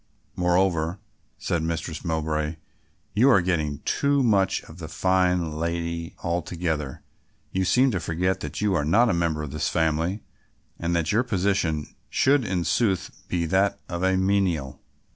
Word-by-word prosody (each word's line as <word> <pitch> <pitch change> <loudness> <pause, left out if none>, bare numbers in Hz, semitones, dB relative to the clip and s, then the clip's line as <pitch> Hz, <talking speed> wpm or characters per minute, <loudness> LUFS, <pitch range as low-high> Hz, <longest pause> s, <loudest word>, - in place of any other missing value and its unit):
"Moreover," 90 -1 +1 0.4
said 85 - -1
Mistress 80 -1 -3
Mowbray, 80 -2 -1 0.6
"you 120 +6 +5
are 125 - +6
getting 80 -5 -1
too 140 -1 +2
much 100 -6 +2
of 80 +2 -13
the 80 - -6
fine 90 -1 +1
lady 85 +1 -3
altogether, 85 -4 -2 0.5
you 95 - 0
seem 130 +7 +4
to 95 - -1
forget 90 +3 -1
that - - -5
you 105 -2 +2
are 85 - +1
not 110 +10 +4
a - - +1
member 85 -3 0
of 75 - -6
this 75 0 -1
family 80 +5 0 0.6
and 85 +1 -1
that 80 -2 +1
your 110 - +3
position 95 - 0 0.2
should 140 0 +3
in 90 -4 -1
sooth 95 -2 +1 0.2
be 85 -2 -1
that 95 +4 +1
of 85 -1 -4
a 95 0 +2
menial." 95 -8 0
85 Hz, 155 wpm, -25 LUFS, 80-95 Hz, 0.6 s, are